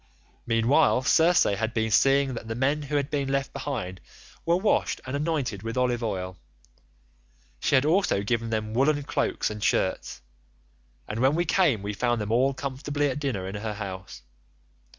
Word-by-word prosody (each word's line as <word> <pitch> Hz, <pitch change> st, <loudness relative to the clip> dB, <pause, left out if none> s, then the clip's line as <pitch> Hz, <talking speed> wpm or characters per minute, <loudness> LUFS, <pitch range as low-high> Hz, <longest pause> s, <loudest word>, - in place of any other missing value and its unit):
"Meanwhile 120 Hz, +4 st, +3 dB
Circe 165 Hz, +5 st, +4 dB
had 110 Hz, +3 st, -1 dB
been 110 Hz, -1 st, 0 dB
seeing 135 Hz, +3 st, +3 dB
that 115 Hz, -1 st, -7 dB
the 115 Hz, -, -3 dB
men 140 Hz, +5 st, +1 dB
who 145 Hz, 0 st, -4 dB
had 145 Hz, +1 st, 0 dB
been 140 Hz, -2 st, -1 dB
left 140 Hz, 0 st, -1 dB
behind 95 Hz, -11 st, -4 dB, 0.5 s
were 170 Hz, -, +4 dB
washed 205 Hz, +3 st, +1 dB
and 130 Hz, +2 st, -4 dB
anointed 140 Hz, -, -2 dB
with 115 Hz, +3 st, -5 dB
olive 125 Hz, -1 st, +1 dB
oil; 95 Hz, -5 st, -4 dB, 1.2 s
she 145 Hz, -, +2 dB
had 130 Hz, +1 st, +4 dB
also 160 Hz, -, +2 dB
given 115 Hz, +2 st, -1 dB
them 110 Hz, -1 st, -2 dB
woollen 145 Hz, +4 st, +2 dB
cloaks 135 Hz, -, -1 dB
and 105 Hz, -1 st, -6 dB
shirts, -, -, -1 dB, 0.8 s
and 105 Hz, -, -4 dB
when 135 Hz, +4 st, +3 dB
we 175 Hz, +1 st, +1 dB
came 155 Hz, -, +2 dB
we 105 Hz, +1 st, -3 dB
found 120 Hz, +2 st, 0 dB
them 105 Hz, 0 st, -3 dB
all 130 Hz, +4 st, +3 dB
comfortably 145 Hz, +2 st, -2 dB
at 135 Hz, -, -4 dB
dinner 120 Hz, -10 st, -2 dB
in 95 Hz, -, -6 dB
her 105 Hz, +1 st, -4 dB
house. 95 Hz, -, -7 dB
125 Hz, 170 wpm, -26 LUFS, 110-145 Hz, 1.2 s, Circe